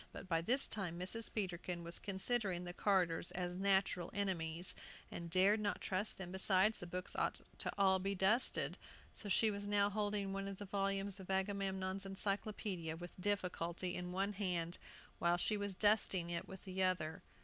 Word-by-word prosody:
But - - -9
by 165 -2 +1
this 250 +11 +4
time 180 -5 -1
Mrs. 190 +6 -2
Peterkin 180 -3 -3
was 170 +1 0
considering 195 -2 +1
the 175 0 -5
carters 180 -4 +1
as 180 -1 -2
natural 190 -2 +2
enemies, 175 -4 0 0.4
and 170 0 -6
dared 190 +5 +4
not 205 -1 -1
trust 195 +3 -2
them; 180 -2 -6
besides, 190 +3 +4
the 175 - -6
books 180 +1 -4
ought - - 0 0.4
all 190 -1 +4
to - - -7
be 195 0 0
dusted. 210 +7 +2 0.3
So 205 - -6
she 215 +3 +4
was 205 0 -4
now 205 0 +3
holding 205 -1 -1
one 195 0 -3
of 195 -1 -5
the 205 - -7
volumes 195 0 -1
of 190 - -10
Agamemnon's 190 0 -1
Encyclopædia, 195 -4 -2
with 175 0 -8
difficulty, 180 -2 -1
in 180 0 -4
one 195 +3 0
hand, 180 -4 -1 0.4
while 170 0 +3
she 210 +4 +4
was 205 -2 -2
dusting 195 -4 +2
it 170 - -3
with 190 -1 -10
the 190 0 -3
other. 170 -4 0
190 Hz, 175 wpm, -38 LUFS, 180-200 Hz, 0.4 s, this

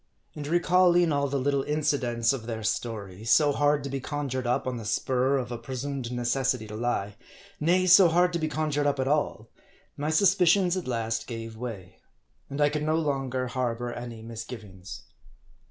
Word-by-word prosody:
And 145 -1 -6
recalling 175 0 +4
all 140 -1 +1
the 140 +1 -1
little 140 +1 +1
incidents 135 -5 0
of 120 -4 -6
their 110 -2 -4
story, 105 -2 -3
so 145 +6 +4
hard 145 +1 +2
to 140 - -4
be 135 - -2
conjured 130 -2 -3
up 120 - 0
on 130 -1 -2
the 115 - -7
spur 130 +5 +1
of 125 -2 -4
a 120 - -4
presumed 130 0 -5
necessity 125 0 0
to 105 - -7
lie; 105 -3 -2 0.4
nay, 180 +4 +3
so 185 0 +8
hard 175 +2 +3
to 170 - 0
be 155 - -1
con 155 0 -2
jured 145 0 +1
up 140 -1 0
at 130 - 0
all; 140 -6 -1 0.5
my 150 +2 -2
suspicions 180 +1 +4
at 185 -6 -4
last 115 -2 -2
gave 115 -1 -6
way. 110 -6 -8 0.5
And 140 - -5
I 145 0 +4
could 150 0 -2
no 155 +1 +1
longer 135 -5 -1
harbor 120 -1 -2
any 120 -2 -7
misgivings. 110 -5 -9
130 Hz, 185 wpm, -27 LUFS, 115-150 Hz, 0.5 s, so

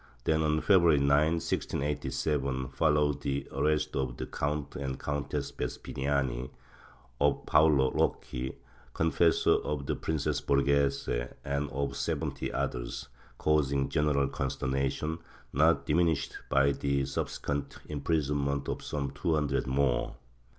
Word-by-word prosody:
Then, 80 +3 +2
on 80 0 +1
February 85 -6 +5
9, 70 0 +2 0.3
1687, 70 -4 -1
followed 75 +1 +2
the 70 -1 -2
arrest 75 0 0
of 65 -3 -2
the - - -3
Count 75 0 -3
and 65 -2 -4
Countess 75 0 -3
Vespiniani, 65 -3 -2 0.7
of 70 0 +2
Paolo 75 -4 +4
Rocchi, 65 +1 -1 0.4
confessor 80 +1 +3
of 75 -2 -3
the - - -1
Princess 80 -3 -1
Borghese, 70 0 +2 0.4
and 70 +1 -1
of 70 +1 -2
seventy - - -2
others, 60 +2 -3 0.3
causing 70 -3 +2
general 75 -2 +2
consternation, 70 +4 -2 0.3
not 75 0 +3
dimin 85 +4 +3
ished 70 -3 -2 0.2
by 70 +1 +4
the 70 -1 0
subsequent 70 +1 -3
imprisonment 70 -2 -1
of - - -3
some 70 -2 -3
two 80 +4 0
hundred 75 -3 0
more. 65 -2 +1
70 Hz, 120 wpm, -30 LUFS, 70-75 Hz, 0.7 s, February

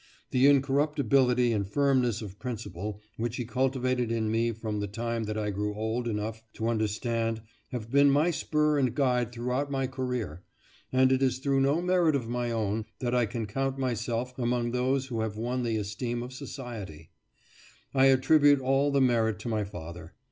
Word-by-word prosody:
The 130 +2 +5
incorruptibility 135 -3 +3
and 100 -3 -1
firmness 125 -1 +1
of 100 -1 -9
principle 105 -4 -5 0.2
which 115 +1 -2
he 120 - -3
cultivated 130 0 0
in 110 -2 0
me 115 +1 +1
from 110 -1 -4
the 105 - -2
time 115 +2 -3
that 105 +1 -3
I 105 -1 -1
grew 105 +1 -2
old 110 +3 -2
enough 110 0 -3
to 115 +1 -2
understand 115 0 -1 0.3
have 120 -3 -6
been 140 +1 +6
my 150 +5 +3
spur 150 -2 +1
and 130 -3 +1
guide 125 -4 +1
throughout 125 +4 -2
my 135 -1 0
career, 125 - -3 0.5
and 130 0 +4
it 130 0 +2
is 130 -2 +2
through 135 0 +1
no 145 +5 +2
merit 180 -4 +3
of 125 -5 -2
my 120 0 -2
own 110 -1 -1
that 120 -2 -1
I 120 -2 +3
can 115 +1 -3
count 135 +5 -2
myself 120 -1 -2
among 120 -1 0
those 130 +2 +1
who 120 -4 -3
have 110 -1 -3
won 120 +3 -2
the 115 -2 0
esteem 120 +4 -3
of 125 +1 -8
society; 110 - -8 0.8
I 135 0 +5
attribute 145 +2 +5
all 135 +2 +2
the 140 -1 +2
merit 115 -4 +2
to 120 - -4
my 110 -2 0
father. 85 -3 -9
120 Hz, 180 wpm, -28 LUFS, 110-135 Hz, 0.8 s, been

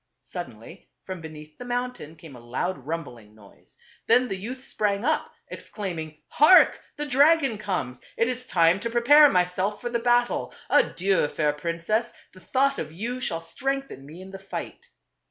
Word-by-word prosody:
Suddenly - - -9
from 185 -2 -7
beneath 155 -1 -11
the - - -6
mountain 245 -10 -4
came 160 -4 -13
a - - -11
loud 130 +5 -4
rumbling 120 -10 -6
noise. 105 -2 -18 0.3
Then 250 +2 +4
the 195 - -3
youth 245 +7 -7
sprang 205 -1 -1
up, 315 - 0 0.2
exclaiming, 160 -7 -6
"Hark! 310 +6 +6
the 295 - -4
dragon 280 -3 +3
comes. 180 -12 -3 0.2
It 230 - +2
is 250 0 -4
time 170 -1 +3
to 235 - -3
pre 240 +1 0
pare 295 +4 +8
myself 185 +2 0
for 240 - -5
the 235 - 0
battle. 240 +1 +1 0.2
Adieu, 195 - +2
fair 150 0 0
princess! 170 +9 -2 0.2
the 185 - -15
thought 275 +7 +1
of 155 - -5
you 235 +9 -5
shall 165 -9 -3
strengthen 270 - -4
me 165 +5 -11
in 190 - -12
the 195 - -8
fight." 195 0 -8
195 Hz, 170 wpm, -25 LUFS, 165-245 Hz, 0.3 s, pare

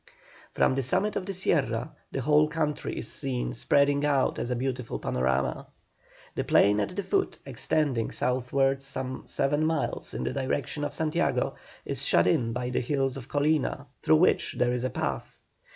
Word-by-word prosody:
From - - +3
the 135 - 0
summit 200 - 0
of 185 - -3
the 195 - -2
Sierra 130 - 0 0.2
the 135 - -2
whole 150 +3 +4
country 155 -1 -2
is - - -3
seen 130 -3 -2
spreading 140 +4 +2
out 140 -2 +2
as - - -2
a 125 - 0
beautiful 125 -1 -3
panorama. 65 +1 -1 0.7
The - - -1
plain 105 +1 +4
at 145 - -2
the 200 - -2
foot, 390 - 0
extending 135 -7 0
southwards 135 +2 0
some 130 -1 -4
seven 145 +3 0
miles 160 -2 -1
in - - -2
the - - -2
direction 140 +2 -2
of - - -3
Santiago, 155 -1 0 0.3
is - - -4
shut - - +4
in 115 +6 +2
by 125 +1 -3
the - - 0
hills 135 0 0
of 135 -3 -8
Colina, 145 0 +1
through 80 - +4
which - - +3
there 125 0 +2
is 125 0 -2
a 130 - 0
path. 70 - -3
135 Hz, 175 wpm, -28 LUFS, 125-150 Hz, 0.7 s, whole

